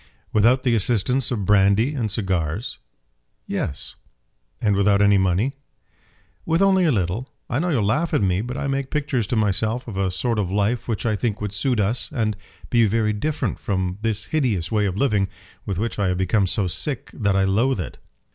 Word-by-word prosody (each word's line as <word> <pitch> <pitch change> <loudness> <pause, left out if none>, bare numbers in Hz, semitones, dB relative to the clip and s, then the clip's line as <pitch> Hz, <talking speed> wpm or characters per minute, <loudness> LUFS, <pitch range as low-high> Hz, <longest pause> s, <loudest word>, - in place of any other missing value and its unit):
"Without 120 +5 +4
the 125 - +2
assistance 120 +4 +1
of 105 -6 -2
brandy 105 +6 +4
and 115 -7 -2
cigars." 95 -1 -2 0.7
"Yes." 70 - -4 0.7
"And 105 -2 +2
without 100 0 +3
any 100 -1 +5
money." 95 +8 +1 0.9
"With 165 +1 +1
only 190 -2 +4
a 160 - +3
little. 105 +4 -1 0.2
I 120 - +1
know 175 +3 0
you'll 130 -10 +1
laugh 150 +12 +1
at - - +1
me; 95 0 +1
but 125 +3 -5
I - - -3
make 135 -1 -2
pictures 140 -7 -1
to 120 - -1
myself 110 +3 0
of 105 -5 -6
a 95 -1 +1
sort 115 +4 0
of 95 -4 -1
life 105 +5 0
which 115 -1 -2
I 110 -2 +1
think 110 0 -2
would 105 -1 -4
suit 125 +2 0
us, 105 +2 0
and 110 -7 -1 0.4
be 115 -2 +4
very 105 +1 +1
different 150 +9 -2
from 95 -1 -2
this 110 -2 -1
hideous 115 - 0
way 105 -2 +2
of 95 0 -3
living, 105 -6 +2 0.4
with 100 -3 -2
which 110 +2 -2
I 100 - +2
have 90 0 0
become 95 +2 +2
so 100 +2 +1
sick 125 - -3
that 100 -3 0
I 95 - +3
loathe 110 +5 +2
it." 90 - -6
105 Hz, 195 wpm, -22 LUFS, 100-125 Hz, 0.9 s, any